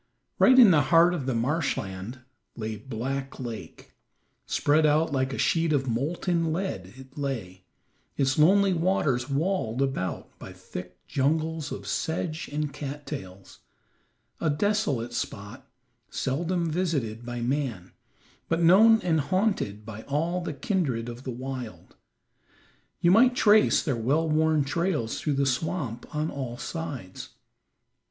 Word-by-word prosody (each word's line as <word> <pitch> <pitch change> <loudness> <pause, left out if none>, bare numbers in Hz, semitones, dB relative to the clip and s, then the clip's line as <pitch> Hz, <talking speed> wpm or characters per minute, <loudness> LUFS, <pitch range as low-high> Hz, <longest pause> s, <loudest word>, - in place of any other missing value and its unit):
Right 260 0 +6
in 235 -7 +9
the 150 -3 +5
heart 170 +1 +6
of 145 -7 -3
the 130 - 0
marsh 145 +8 0
land 95 +6 -6 0.3
lay 110 -1 -4
Black 130 +5 -5
Lake. 120 -4 -8 0.5
Spread 150 +2 +2
out 155 +1 +3
like 130 -1 0
a 135 - -4
sheet 165 -1 +1
of 135 -3 +1
molten 165 +7 0
lead 155 - -3
it 135 +2 -12
lay, 105 -10 -4 0.5
its 135 0 +1
lonely 195 +4 +5
waters 155 -8 +1
walled 140 - -1
about 135 -9 -3
by 95 - -9
thick 90 -1 -10
jungles 155 +2 0
of - - -6
sedge 160 0 -3
and 150 -1 -2
cattails; 140 -10 -7 0.8
a 160 - 0
desolate 145 - 0
spot, 115 +3 -5 0.4
seldom 165 +5 -1
visited 145 -10 -1
by 120 0 -5
man, 120 -8 -2 0.6
but 165 - +1
known 215 +7 +6
and 160 -5 +1
haunted 185 - -1
by 110 -1 -8
all 165 +6 -1
the 175 - -4
kindred 140 - -1
of 120 +2 -9
the - - -4
wild. 130 -1 -7 1.1
You 175 - +4
might 245 +5 +5
trace 215 -3 +5
their 140 -6 0
well 140 +8 +1
worn 155 -1 +2
trails 150 -5 -1
through 150 - 0
the 140 0 +1
swamp 135 -2 -2
on 155 +1 -1
all 130 -4 -5
sides. 145 - -6
145 Hz, 135 wpm, -27 LUFS, 120-165 Hz, 1.1 s, in